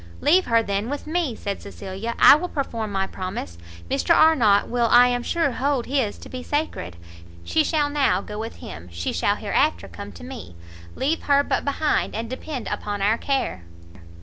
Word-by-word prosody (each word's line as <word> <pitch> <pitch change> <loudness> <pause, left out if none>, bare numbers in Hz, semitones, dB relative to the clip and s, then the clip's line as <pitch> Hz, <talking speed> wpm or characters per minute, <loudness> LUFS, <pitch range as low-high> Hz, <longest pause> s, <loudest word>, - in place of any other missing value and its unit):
"Leave 360 +5 +4
her 230 -1 +3
then 200 +2 -2
with 290 +1 -4
me!" 310 -6 -1
said 200 -2 -5
Cecilia, 200 +3 -6
"I - - +9
will 345 +4 -2
perform 230 -9 -3
my 195 -1 0
promise, 185 - -6 0.3
Mr 280 +5 +2
Arnott 240 -11 +5
will 240 -1 +1
I 245 +2 +7
am 245 0 0
sure 330 +3 0
hold 270 0 0
his 260 -6 -1
to - - -11
be 255 - -7
sacred, 290 - -3 0.5
she 315 - +2
shall 300 -1 +1
now 280 -10 +2
go 210 +1 -7
with 225 +1 -5
him, 85 +2 -10
she 85 0 -3
shall - - +1
hereafter 85 +3 0
come 95 +3 -9
to 85 -1 -12
me, 90 +1 -9 0.4
leave 310 +5 0
her 285 0 +4
but - - -1
behind, 290 +1 0
and 230 +2 -4
depend 260 -1 -5
upon 205 -1 -3
our 215 +3 +2
care." 270 - -1
240 Hz, 185 wpm, -23 LUFS, 200-285 Hz, 0.5 s, I